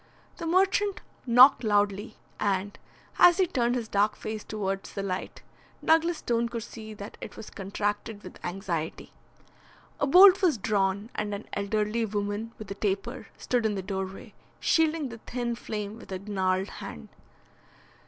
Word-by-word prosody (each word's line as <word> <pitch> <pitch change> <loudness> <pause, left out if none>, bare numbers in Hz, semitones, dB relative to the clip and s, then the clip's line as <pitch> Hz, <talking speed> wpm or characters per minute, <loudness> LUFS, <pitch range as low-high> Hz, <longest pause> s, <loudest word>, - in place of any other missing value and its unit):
The 335 - -4
merchant 385 +3 +2 0.3
knocked 250 +2 +7
loudly, 205 0 +1 0.2
and, 200 0 -1 0.4
as 350 -1 +8
he 380 - +4
turned 245 -6 0
his 235 -3 -2
dark 205 0 +2
face 215 -1 -5
towards 195 -2 -4
the 200 - -2
light, 185 -2 -4 0.4
Douglas 325 +1 +4
Stone 235 -3 0
could 230 -1 -4
see 220 -2 -9
that 200 0 -9
it - - -8
was 220 - -9
contracted 205 +1 -3
with - - -12
anxiety. 175 -3 -4 0.9
A 285 - +1
bolt 375 +5 +8
was 345 -9 +3
drawn, 200 +1 0
and 210 -1 -2
an 200 - -8
elderly 210 +3 0
woman 205 +1 -2
with 215 -2 -9
a - - 0
taper 205 +5 -3
stood 245 -2 0
in 215 -2 +1
the 190 - -3
doorway, 190 0 -5 0.3
shielding 320 -3 +2
the 230 -1 -9
thin 240 +1 -3
flame 215 -2 -5
with - - -13
her 190 - -3
gnarled 190 -1 -1
hand. 75 -1 -8
215 Hz, 155 wpm, -28 LUFS, 200-240 Hz, 0.9 s, as